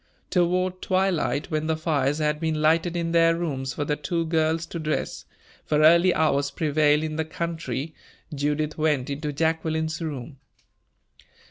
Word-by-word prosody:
Toward 185 0 +1
twilight, 180 -7 0
when 155 0 -1
the 160 0 0
fires 145 -3 0
had 150 -1 0
been 160 -1 -1
lighted 165 +3 +2
in 165 -1 -1
their 165 0 +4
rooms 135 -6 -3
for 145 - -2
the 150 - 0
two 165 +2 -2
girls 160 0 +1
to 170 - -6
dress, 155 -1 -3 0.4
for 150 0 +1
early 170 +3 +6
hours 145 -4 +1
prevail 150 0 +2
in 155 0 -3
the 160 - +1
country, 160 -3 -4 0.4
Judith 150 +2 -1
went 150 -4 +1
into 150 +1 -3
Jacqueline's 160 +1 -1
room. 140 -3 -6
155 Hz, 150 wpm, -25 LUFS, 150-165 Hz, 0.4 s, early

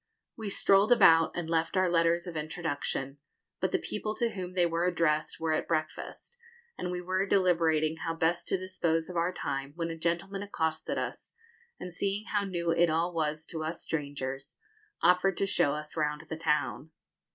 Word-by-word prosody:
We 220 -3 -5
strolled 195 +3 +4
about, 165 -8 +7
and 175 -2 -3
left 165 +2 0
our 185 0 +4
letters 170 0 +2
of 175 -2 -7
introduction; 150 -3 -3 0.4
but - - 0
the - - +3
people 215 0 -4
to 235 -1 0
whom 185 -2 -6
they 180 -1 +3
were 170 +1 0
addressed 160 -3 +1
were 160 -1 0
at - - -1
breakfast, 160 - -4 0.4
and 180 - -4
we 180 0 -3
were 185 +2 0
deliberating 165 -5 +2
how 165 +1 -3
best 165 +1 0
to - - +1
dispose 180 -3 -1
of - - -9
our 170 +1 +1
time, 140 -4 -4
when 165 -1 -2
a - - -4
gentleman 170 +4 -2
accosted 160 -6 -2
us, - - -5 0.4
and, 180 - -7
seeing 200 +4 -1
how 205 -3 0
new 170 -3 -1
it 170 +1 +4
all 165 +3 +1
was 155 -1 -1
to 160 -2 -4
us 160 +2 -4
strangers, 140 -2 -4 0.5
offered 180 +2 +4
to - - +1
show 145 -6 +2
us 150 0 -6
round 150 -1 -1
the 160 - -4
town. 155 -1 -1
165 Hz, 185 wpm, -30 LUFS, 155-180 Hz, 0.5 s, about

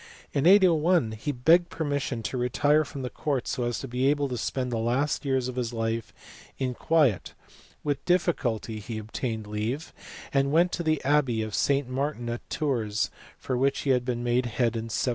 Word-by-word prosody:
In 140 +2 +2
801 175 - +5
he 110 +7 -3
begged 165 +7 +4
permission 140 -6 -2
to 130 - -3
retire 145 +5 +2
from 140 -2 -7
the 125 - -3
court 140 -5 -2
so 125 -1 -1
as 120 0 -1
to 135 - -5
be 125 +2 0
able 145 0 +2
to 125 - -3
spend 125 +2 -2
the 115 - -1
last 125 +6 0
years 130 -2 +1
of 130 0 -6
his 120 -1 -2
life 115 0 -2 0.5
in 130 -2 -1
quiet: 140 - +1 0.5
with 145 -2 -1
dif 180 0 +3
ficulty 115 -9 -2
he 110 +2 -6
obtained 110 +1 -4
leave, 110 +9 -3 0.4
and 135 0 +2
went 170 +3 +4
to - - -2
the 155 -2 0
abbey 135 -5 +2
of 110 -1 -6
St. 140 -2 +1
Martin 130 -2 -2
at 120 +1 -3
Tours, 115 -7 -1 0.4
of 125 -2 0
which 135 +1 +1
he 140 - +1
had 125 -1 +2
been 120 -1 -2
made 120 +1 +1
head 120 0 0
in 115 0 -4
796. 120 - 0
130 Hz, 200 wpm, -27 LUFS, 115-145 Hz, 0.5 s, 801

